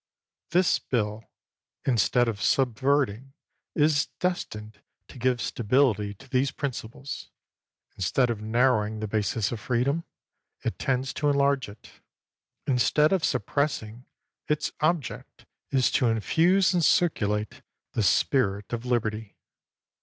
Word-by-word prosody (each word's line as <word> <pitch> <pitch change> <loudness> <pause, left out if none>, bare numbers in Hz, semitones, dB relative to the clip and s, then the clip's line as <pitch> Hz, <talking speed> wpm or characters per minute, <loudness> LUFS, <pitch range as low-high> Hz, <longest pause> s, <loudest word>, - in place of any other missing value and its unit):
This 180 0 +3
bill, 110 -2 -2 0.6
instead 120 -1 +3
of 105 -4 -3
subverting, 130 +2 +1 0.4
is 150 -1 +3
destined 110 - -3 0.3
to - - -12
give 125 0 +1
stability 110 -4 +1
to 135 - -16
these 130 +1 +1
principles; 135 -1 -6 0.7
in - - -12
stead 120 +7 +2
of 110 -3 -4
narrowing 110 -1 +1
the 110 - -3
basis 105 0 -1
of 120 - -4
freedom, 130 +8 0 0.6
it - - -3
tends 135 0 -1
to 145 - 0
enlarge 140 -3 +2
it; 100 +1 -14 0.7
instead 150 +5 +3
of 185 -4 +1
suppressing, 125 -5 -1 0.4
its 150 -1 0
object 155 -3 -2 0.2
is 130 -2 +2
to 125 - +2
infuse 170 - +3
and 175 -2 +2
circulate 105 - +1 0.3
the - - -1
spirit 100 - +1
of 120 +1 -3
liberty. 110 -3 -2
125 Hz, 120 wpm, -26 LUFS, 110-140 Hz, 0.7 s, This